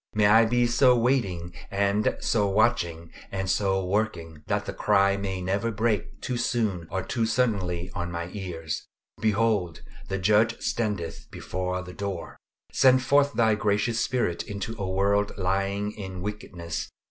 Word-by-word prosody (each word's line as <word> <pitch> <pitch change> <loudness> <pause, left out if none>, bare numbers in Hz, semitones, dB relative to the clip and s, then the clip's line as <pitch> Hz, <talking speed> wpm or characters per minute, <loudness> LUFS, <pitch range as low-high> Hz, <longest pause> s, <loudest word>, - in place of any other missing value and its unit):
May 105 -1 +4
I 110 +2 +6
be 120 +2 +2
so 125 +1 +4
waiting 100 -9 0 0.2
and 100 +1 +1
so 105 -3 +2
watching, 85 -6 +1 0.2
and 95 -1 -2
so 95 -1 +1
working, 90 -6 -2
that - - 0
the - - -4
cry 100 0 +3
may 95 -2 -3
never 100 +5 0
break 110 0 -1
too 125 - -2
soon 105 -9 -1
or 95 - -2
too 115 -3 -1
suddenly 95 -7 0
on 85 0 -3
my 85 0 -5
ears 85 -6 -5 0.3
"Behold, 105 -6 +1 0.2
the 95 - -2
Judge 110 +4 +3
standeth 105 -8 -3
before 90 0 -3
the 90 0 -9
door!" 100 -3 -5 0.4
Send 130 -1 +5
forth 140 +2 +3
thy 110 -1 +3
gracious 105 +2 +1
Spirit 115 -10 0
into 105 +2 -5
a 95 - -2
world 100 +2 +1
lying 100 +2 0
in 95 -4 -7
wickedness. 90 -5 -5
100 Hz, 150 wpm, -26 LUFS, 90-110 Hz, 0.4 s, I